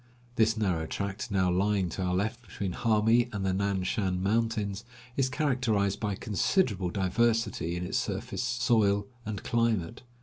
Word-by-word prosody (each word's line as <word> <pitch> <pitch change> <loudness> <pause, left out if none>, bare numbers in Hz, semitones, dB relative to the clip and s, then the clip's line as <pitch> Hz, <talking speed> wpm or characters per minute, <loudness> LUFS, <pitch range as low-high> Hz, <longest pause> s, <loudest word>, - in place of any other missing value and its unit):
This 110 -1 +3
narrow 90 -7 0
tract, 100 +4 -4
now 95 -3 +2
lying 95 +1 +1
to 95 - -5
our 90 -1 0
left 110 +6 -1
between 100 -5 -5
Hami 115 +3 +3
and 100 -2 -3
the 95 - +1
Nan 100 -1 0
Shan 95 -2 -1
mountains, 105 -1 0 0.3
is 135 -1 +1
characterized 120 -9 +1
by 105 -2 -1
considerable 105 - +1
diversity 105 -1 0
in 90 0 -3
its 100 +7 0
surface, 115 +2 -3
soil, 115 -5 +2 0.2
and 105 -3 -4
climate. 115 -3 0
105 Hz, 155 wpm, -29 LUFS, 95-115 Hz, 0.3 s, This